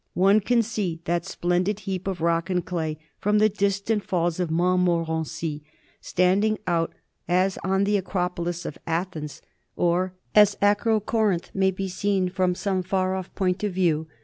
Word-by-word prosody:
One 195 +3 +5
can 235 +3 +2
see 205 -7 -3
that 170 +1 -1
splendid 185 +3 0
heap 190 -1 -4
of 185 -4 -3
rock 170 +2 +1
and 180 -2 0
clay 160 -4 -2 0.2
from 210 +1 +2
the 215 +1 +5
distant 200 +1 0
Falls 175 -1 -1
of 180 -3 0
Montmorency, 165 -3 0 0.4
standing 195 +4 +2
out 170 -2 0 0.4
as 185 +2 +1
the 195 +2 +2
Acropolis 180 -2 -2
of - - -6
Athens 165 -3 -3 0.3
or 180 +2 +1 0.2
as 210 -1 +6
Acrocorinth 210 -2 +1
may 190 0 +3
be 190 +1 -3
seen 190 0 0
from 185 -1 0
some 190 0 -1
far 185 0 0
off 190 -1 -5
point 185 0 0
of 205 -3 -1
view. 165 -4 +1
185 Hz, 150 wpm, -25 LUFS, 175-200 Hz, 0.4 s, as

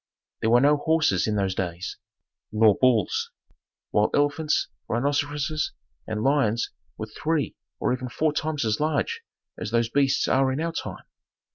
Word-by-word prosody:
There 110 - +2
were 120 +1 +6
no 145 +2 +5
horses 145 - +2
in 105 - 0
those 95 -2 0
days, 90 -1 -4 0.5
nor 110 -1 +5
bulls; 120 -6 +2 0.6
while 105 0 +3
elephants, 145 +2 +1 0.2
rhinoceroses 145 +4 -1 0.3
and 110 0 -2
lions 125 -5 +2 0.3
were 110 - -4
three 150 +8 -2 0.2
or - - +1
even 130 0 -4
four 155 +4 0
times 150 -4 -1
as 110 -1 0
large 160 - 0 0.4
as - - -3
those 115 0 +1
beasts 140 +2 +2
are 135 0 +3
in 130 - -2
our 165 +1 -1
time. 165 - -6
135 Hz, 150 wpm, -25 LUFS, 110-150 Hz, 0.6 s, were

